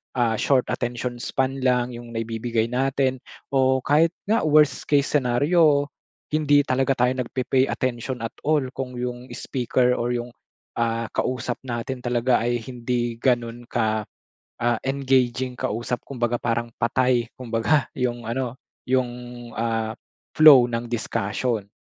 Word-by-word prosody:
ah 115 -3 +1
short 130 -3 +3
attention 120 0 -3
span 135 +2 -1
lang 125 -1 +1
yung 120 -1 -9
naibibigay 115 0 -1
natin 130 0 0 0.3
o 130 -1 +2
kahit 160 +4 +3
nga 215 -5 +1
worst 150 -1 +3
case 145 -1 +2
scenario 145 +2 +3 0.4
hindi 145 -2 +4
talaga 135 0 +1
tayo 125 +1 +1
nagpe-pay 130 +1 +1
attention 125 -1 -3
at 115 - -3 0.2
all 155 -2 +3
kung 130 -1 -5
yung 125 0 -4
speaker 125 -1 0
or 120 +1 0
yung 120 0 -4 0.5
ah, 115 -1 -1
kausap 125 -1 -2
natin 125 +2 -3
talaga 120 0 +1
ay 120 0 -1
hindi 120 -1 -3
ganun 120 -1 0
ka 110 -2 0 0.6
ah, 120 -1 +2
engaging 130 -2 +1
kausap. 120 +3 -2
Kumbaga 120 -3 -1
parang 120 0 -1
patay 125 0 +2
kumbaga 125 +4 0
yung 120 -1 -1
ano 120 +1 -3 0.3
yung 130 -1 +1 0.5
ah, 115 -1 -1 0.4
flow 145 -6 +9
ng 115 0 -2
discussion. 110 -1 -2
125 Hz, 130 wpm, -24 LUFS, 120-130 Hz, 0.6 s, flow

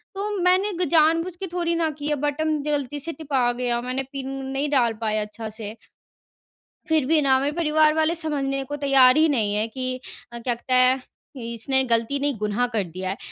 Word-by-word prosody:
"तो 405 +2 -3
मैंने 370 +3 +2
जानबूझ 330 +2 +2
के 380 +2 -6
थोड़ी 340 -1 0
न 330 -1 +1
किया 295 +1 -1
है, 280 - -8
बटन 300 +1 0
गलती 290 -1 -2
से 330 +4 -5
टिपा 275 -5 0
गया 240 -1 -1
मैंने 255 +2 -3
पिन 270 -1 -5 0.2
नहीं 270 +2 -2
डाल 245 -5 +2
पाया 215 -1 0
अच्छा 215 +1 -6
से" 215 0 -8 1.1
फिर 315 -4 +2
भी 310 +1 +3
न 270 -2 +4
मेरे 285 +1 0
परिवार 310 -1 +3
वाले 315 +2 +1
समझने 275 -4 -2
को 290 - -4
तैयार 275 -1 +5
ही 320 +1 +5
नहीं 215 -7 +1
है, 215 +2 +1
कि 255 +2 -4 0.3
अ, 235 - -7
क्या 240 +1 -1
कहते 255 +2 -4
हैं 255 +1 +4 0.4
इसने 235 +3 -1
गलती 230 +4 +1
नहीं 285 -4 -1
गु़नाह 210 +4 0
कर 210 - +1
दिया 185 +2 -6
है। 195 - -3
275 Hz, 200 wpm, -23 LUFS, 240-310 Hz, 1.1 s, तैयार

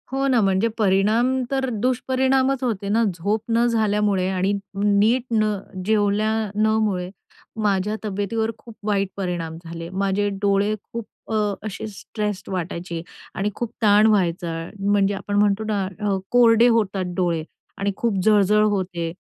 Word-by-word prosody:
हो 270 +1 0
ना, 255 -3 +3
म्हणजे 195 +2 +2
परिणाम 220 +6 +2
तर 265 -1 0
दुष्परिणामच 260 +1 +1
होते 205 -5 -2
ना. 225 +3 +3
झोप 200 +6 -1
न 230 +1 +3
झाल्यामुळे 210 -4 +1
आणि 190 +1 0 0.3
नीट 210 +5 +3
न 215 -1 +2 0.3
जेवल्या 210 0 +2 0.2
न 215 +1 +3 0.2
मुळे 180 -3 -2 0.5
माझ्या 205 0 +1
तब्येतीवर 215 +2 -1
खूप 230 -2 -14
वाईट 200 -2 +1
परिणाम 175 -4 -3
झाले. 165 0 -7
माझे 195 +2 0
डोळे 200 +1 +2
खूप 230 -1 -7 0.3
अ, - - 0 0.3
असे 215 0 -5
स्ट्रेस्ड 210 -1 -5
वाटायचे 170 -2 -4 0.3
आणि 200 +2 0
खूप 235 -2 -4
ताण 210 0 +5
व्हायचा, 180 -5 +1 0.3
म्हणजे 200 0 +2
आपण 205 +1 -4
म्हणतो 205 +1 +2
ना 205 -2 0 0.2
अ, 205 -2 0
कोरडे 235 -1 +6
होतात 195 -6 +1
डोळे 170 -3 0 0.3
आणि 200 +1 0
खूप 230 -4 0
जळ-जळ 210 0 +4
होते, 180 -4 -2
205 Hz, 145 wpm, -22 LUFS, 195-225 Hz, 0.5 s, कोरडे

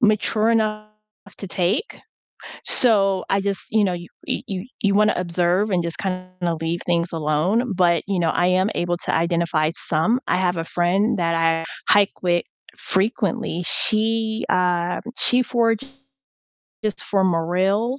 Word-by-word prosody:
mature 215 0 +2
enough 215 -1 0 0.5
to 200 - -6
take. 185 - -1 0.6
So 195 -6 +3
I 195 0 +1
just, 200 -1 -2
you 215 -1 +3
know, 185 - +1
y 175 0 -6 0.4
y 190 0 -4 0.2
you 200 -4 +2
wanna 210 +1 +4
observe 180 +3 +1
and 180 -3 +1
just 170 0 -5
kinda 185 -2 -3
leave 165 +1 -2
things 170 0 0
alone, 170 +9 0
but, 170 -2 +3
you 200 -2 -1
know, 165 -2 +2
I 175 - +1
am 185 +3 +2
able 175 0 -1
to - - -1
identify 170 -2 +1 0.2
some. 165 +10 +2
I - - +2
have 180 -1 +1
a 165 - -2
friend 190 +7 +1
that 165 -1 +1
I 165 0 +1 0.3
hike 205 -1 +3
with 175 -1 +1 0.3
frequently, 195 -2 -1
she, 220 0 0
uh 180 -1 +1 0.2
she 250 +1 +3
forages 230 -1 +1 1.2
for 195 -2 +1
morels, 190 +8 +1
185 Hz, 145 wpm, -22 LUFS, 175-215 Hz, 1.2 s, wanna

